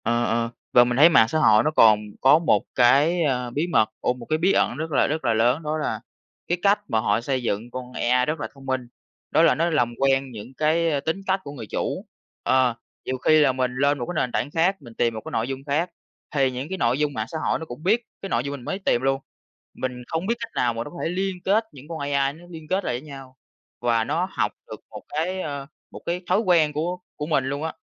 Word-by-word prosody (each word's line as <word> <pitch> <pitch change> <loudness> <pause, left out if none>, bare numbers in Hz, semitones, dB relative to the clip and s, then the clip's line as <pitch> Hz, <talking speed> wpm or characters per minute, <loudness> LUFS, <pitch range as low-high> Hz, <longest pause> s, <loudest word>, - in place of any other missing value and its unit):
Ờ, 120 +1 +1
ờ, 115 +1 0 0.2
và 120 - +8
mình 120 0 -1
thấy 155 +4 +8
mạng 115 -9 +6
xã 155 - 0
hội 110 -6 +5
nó 155 - +1
còn 110 -8 +6 0.2
có 140 +4 +6
1 170 - +2
cái, 145 +8 +4
à, 125 -4 0
bí 150 +8 -1
mật, 135 -11 +3
ồ 125 - +1
1 125 -2 -11
cái 155 - 0
bí 180 +4 +2
ẩn 120 - +1
rất 160 +1 -4
là 140 - +3
rất 155 +2 -2
là 115 - +3
lớn 120 +8 +2
đó 155 +1 -1
là 130 -8 -2 0.5
cái 175 - 0
cách 200 +2 +4
mà 110 - +1
họ 105 +1 +1
xây 130 0 -2
dựng 115 +1 -2
con 125 0 -7
AI 125 +1 +2
rất 150 +2 -2
là - - -3
thông 135 -1 -15
minh. 130 -2 -2 0.4
Đó - - +4
là 165 -5 +5
nó 165 +4 +1
làm 120 -7 +1
quen 135 -1 +1
những 115 +3 -9
cái 155 -1 +1
tính 160 +7 -2
cách 190 +1 +2
của 140 - -7
người 125 -7 -8
chủ. - - -3 0.4
Ờ, 130 -2 +3 0.3
nhiều 130 - -2
khi 155 +5 +4
là 145 -3 +5
mình 130 -1 -1
lên 140 +2 +2
1 120 - -2
cái 175 - -5
nền 125 - -3
tảng 140 - -2
khác, 175 +5 +2
mình 120 -4 -12
tìm 115 0 +1
1 110 - -6
cái - - -6
nội 115 +1 -1
dung 135 0 -5
khác 155 +5 0 0.5
thì 135 -2 +3
những 130 +4 -5
cái 190 - -3
nội 125 -4 +1
dung 150 -1 0
mạng 110 -3 -3
xã 160 - -5
hội - - 0
nó 160 - -6
cũng 150 +1 -10
biết 215 +6 +3 0.2
cái 195 - -5
nội 115 -6 0
dung 140 - -4
mình 140 -4 -7
mới 195 - -3
tìm 120 -11 +1
luôn. 135 0 0 0.5
Mình 125 -1 -5
không 160 +2 -2
biết 235 - +1
cách 230 -1 -6
nào 120 -1 +1
mà 115 0 -3
nó 145 - -8
có 175 - -11
thể - - 0
liên 190 +2 -1
kết 215 +4 +3
những 140 0 -13
con 165 -1 -6
AI 140 -1 0
nó 165 +3 -15
liên 160 -3 -10
kết 190 +3 -1
lại - - -1
với - - -14
nhau 135 -2 -11 0.4
và 115 -2 +2
nó 165 +9 -1
học - - 0 0.2
được - - -8
1 - - -9
cái, 180 +5 -2
ờ, 140 -3 -5 0.2
1 - - -9
cái 175 +1 -2
thói 185 +3 +4
quen 170 -8 +3
của 170 +5 -2 0.2
của 150 - -4
mình 145 -4 +2
luôn 140 +3 -3
á. 160 - -3
140 Hz, 265 wpm, -24 LUFS, 125-160 Hz, 0.5 s, và